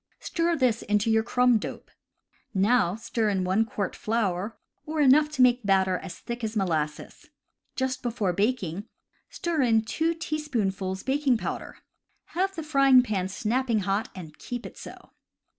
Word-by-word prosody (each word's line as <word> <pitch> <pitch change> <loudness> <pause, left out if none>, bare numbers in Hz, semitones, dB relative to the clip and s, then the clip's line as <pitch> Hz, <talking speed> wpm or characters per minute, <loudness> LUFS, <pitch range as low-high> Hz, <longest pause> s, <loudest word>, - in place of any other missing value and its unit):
Stir 335 0 0
this 250 -6 +1
into 210 +2 +1
your 220 0 +4
crumb 245 0 +3
dope. - - -8 0.6
Now 195 -2 +3
stir 225 0 -1
in 190 -2 0
1 190 +5 +2
quart 205 -3 -3
flour, 210 -2 -1 0.3
or 310 0 -4
enough 295 +2 +5
to 260 - +4
make 250 0 +4
the 205 - -8
batter 190 -2 +3
as 190 - -8
thick 235 0 -6
as 220 0 -3
molasses. 155 -6 -2 0.5
Just 260 -1 -2
before 225 -6 -1
baking, 200 -2 -1 0.4
stir 335 -4 -1
in 225 -3 +3
2 325 +9 0
teaspoonfuls 220 - -2
baking 270 -2 +2
powder. - - -5 0.6
Have 385 +3 0
the 325 - -4
frying 275 -4 +5
pan 195 -6 -1
snapping 230 +3 0
hot, 195 +3 -1
and 160 -5 -9
keep 245 -1 -6
it - - -9
so. - - -12
225 Hz, 160 wpm, -26 LUFS, 195-260 Hz, 0.6 s, enough